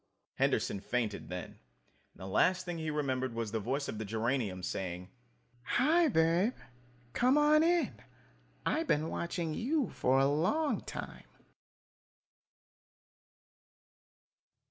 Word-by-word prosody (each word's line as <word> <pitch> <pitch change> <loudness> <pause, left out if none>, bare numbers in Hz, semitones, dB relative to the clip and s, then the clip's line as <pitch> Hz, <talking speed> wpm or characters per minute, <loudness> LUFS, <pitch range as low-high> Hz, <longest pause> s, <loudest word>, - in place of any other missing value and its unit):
Henderson 100 - +1
fainted 110 -1 -2
then, 90 0 -5 0.6
and - - -38
the 95 - -9
last 165 - +2
thing 175 -2 -4
he 160 -1 -3
remembered 130 -5 -1
was 115 -2 -3
the 110 - -1
voice 135 +7 -2
of 110 - -5
the - - -2
geranium 110 -3 -1
saying: 90 0 -4 0.5
"Hi, 315 - +3
Babe, 175 - +2 0.6
come 255 +4 +3
on 300 +1 +5
in. 345 +1 +2 0.7
I 315 - +1
been 160 - 0
watching 170 -2 -3
you 275 - 0
for 130 - +2
a 135 - +4
long 185 - +1
time!" - - -7
150 Hz, 120 wpm, -32 LUFS, -, 0.7 s, on